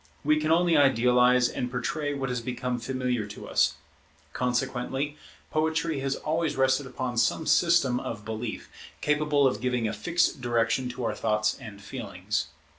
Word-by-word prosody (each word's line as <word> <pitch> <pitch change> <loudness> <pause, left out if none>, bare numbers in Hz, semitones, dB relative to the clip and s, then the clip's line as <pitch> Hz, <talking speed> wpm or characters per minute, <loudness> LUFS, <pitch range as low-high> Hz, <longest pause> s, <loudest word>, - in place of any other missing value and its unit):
We 155 +1 +3
can 155 +1 0
only 170 0 +4
idealize 125 -2 +4
and 125 +1 -3
portray 145 +4 -2
what 135 -1 -3
has 125 -1 -2
become 125 0 -3
familiar 125 -2 -2
to 105 - -9
us; - - +2 0.6
consequently 130 +3 -1 0.4
poetry 160 -1 0
has 135 0 -1
always 160 -1 -1
rested 130 +1 +2
upon 125 -1 -4
some 120 +7 +1
system 165 -9 +3
of 105 -4 -6
belief, 110 +1 -5 0.3
capable 150 -1 +2
of 120 -5 +1
giving 125 -2 0
a 105 - -2
fixed 165 +6 0
direction 120 +1 +1
to 125 0 -6
our - - 0
thoughts 105 -1 +1
and 100 -2 -10
feelings. 100 -3 -3
125 Hz, 155 wpm, -27 LUFS, 120-145 Hz, 0.6 s, only